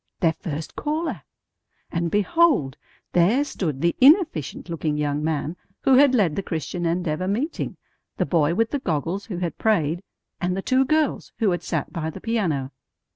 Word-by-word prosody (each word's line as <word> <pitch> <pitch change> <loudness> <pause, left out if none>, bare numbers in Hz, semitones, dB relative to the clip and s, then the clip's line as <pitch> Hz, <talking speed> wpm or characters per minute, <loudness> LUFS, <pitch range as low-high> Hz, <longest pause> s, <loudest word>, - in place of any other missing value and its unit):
Their 165 -3 +3
first 155 -1 -6
caller! 305 - -2 0.7
And 170 0 -1
behold, 205 - +2 0.4
there 200 +11 +4
stood 155 - -3
the 170 0 +2
inefficient 290 - +4
looking 160 -3 -2
young 150 0 -1
man 160 +1 -2 0.3
who 270 - +4
had 265 0 +6
led 185 -10 +2
the - - -1
Christian 175 0 -3
Endeavor 170 0 -1
meeting, 245 - -2 0.4
the - - +1
boy 165 -1 +2
with 225 +3 +1
the 285 - 0
goggles 175 - -2
who 190 -6 -4
had 175 -2 -3
prayed, 175 -6 +1 0.4
and 180 +1 -1
the 195 - -3
two 260 +1 +3
girls 310 0 0
who 215 -5 +2
had 175 - -1
sat 160 -4 -3
by 160 -1 -2
the - - -8
piano. 170 - -1
175 Hz, 170 wpm, -24 LUFS, 160-230 Hz, 0.7 s, had